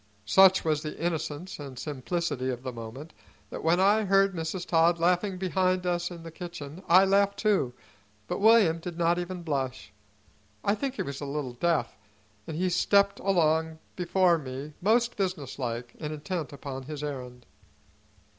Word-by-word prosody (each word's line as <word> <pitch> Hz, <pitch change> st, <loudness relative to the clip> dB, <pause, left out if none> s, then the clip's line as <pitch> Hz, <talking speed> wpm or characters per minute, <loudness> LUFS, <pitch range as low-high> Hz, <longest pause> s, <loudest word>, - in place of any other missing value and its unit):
Such 190 Hz, -, +6 dB
was 155 Hz, -2 st, +1 dB
the 150 Hz, -1 st, -6 dB
innocence 165 Hz, +1 st, -3 dB
and 135 Hz, -3 st, -8 dB
simplicity 145 Hz, -1 st, -3 dB
of 125 Hz, -1 st, -4 dB
the 130 Hz, -1 st, -4 dB
moment 120 Hz, +7 st, -9 dB, 0.4 s
that -, -, -6 dB
when 165 Hz, +2 st, +3 dB
I 205 Hz, +3 st, +4 dB
heard 195 Hz, 0 st, +4 dB
Mrs. 170 Hz, +2 st, -4 dB
Todd 170 Hz, 0 st, +3 dB
laughing 180 Hz, +3 st, +1 dB
behind 185 Hz, 0 st, 0 dB
us 175 Hz, -1 st, 0 dB
in 170 Hz, -2 st, -9 dB
the 165 Hz, -, -8 dB
kitchen 170 Hz, -2 st, -8 dB
I 185 Hz, +3 st, +7 dB
laughed 200 Hz, +1 st, +3 dB
too, 195 Hz, -, +1 dB, 0.5 s
but -, -, -3 dB
William 205 Hz, -6 st, +5 dB
did 170 Hz, 0 st, -7 dB
not 170 Hz, +1 st, +2 dB
even 175 Hz, 0 st, -5 dB
blush. 135 Hz, -8 st, -3 dB, 0.7 s
I 200 Hz, -, +2 dB
think 265 Hz, +4 st, -3 dB
he -, -, -2 dB
was 140 Hz, 0 st, -6 dB
a -, -, -3 dB
little 140 Hz, -3 st, -4 dB
deaf, 150 Hz, -1 st, 0 dB, 0.5 s
and 155 Hz, -, -5 dB
he 185 Hz, +2 st, +1 dB
stepped 200 Hz, +3 st, +3 dB
along 160 Hz, -4 st, +1 dB, 0.2 s
before 180 Hz, -1 st, +2 dB
me 135 Hz, +2 st, -7 dB
most 235 Hz, +5 st, +2 dB
businesslike 130 Hz, -, -3 dB
and 150 Hz, -1 st, -4 dB
intent 155 Hz, +1 st, -4 dB
upon 140 Hz, -1 st, -6 dB
his 150 Hz, +2 st, -7 dB
errand. 125 Hz, -4 st, -6 dB
165 Hz, 165 wpm, -28 LUFS, 145-185 Hz, 0.7 s, I